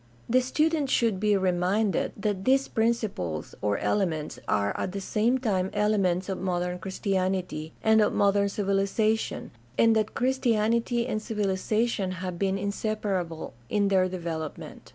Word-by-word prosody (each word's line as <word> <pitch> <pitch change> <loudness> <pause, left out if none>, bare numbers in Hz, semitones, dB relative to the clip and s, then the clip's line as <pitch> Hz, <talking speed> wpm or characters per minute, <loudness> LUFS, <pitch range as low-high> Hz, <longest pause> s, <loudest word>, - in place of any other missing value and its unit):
The 255 +2 +4
student 300 +2 +1
should 225 -7 +2
be 210 0 +3
reminded 190 +3 +1
that 200 -2 -2
these 270 +3 +3
principles 220 - -1
or 105 -1 +1
elements 165 -7 -1
are 100 0 +1
at 185 - -3
the 200 - -3
same 220 +6 +1
time 195 -7 0
elements 195 -4 +1
of 190 -2 -3
modern 180 -1 -1
Christianity 185 -4 -2
and 220 0 +5
of 210 - +3
modern 200 0 +2
civilization, 200 +2 0 0.3
and 225 -1 +5
that 215 -1 0
Christianity 235 -2 +1
and 215 -3 -2
civiliza 210 +1 0
tion 195 -5 -2
have 180 -1 -5
been 195 -1 +1
inseparable 200 -4 -2 0.2
in 205 -1 +2
their 185 -1 +3
development. 165 -4 -6
200 Hz, 140 wpm, -27 LUFS, 185-220 Hz, 0.3 s, and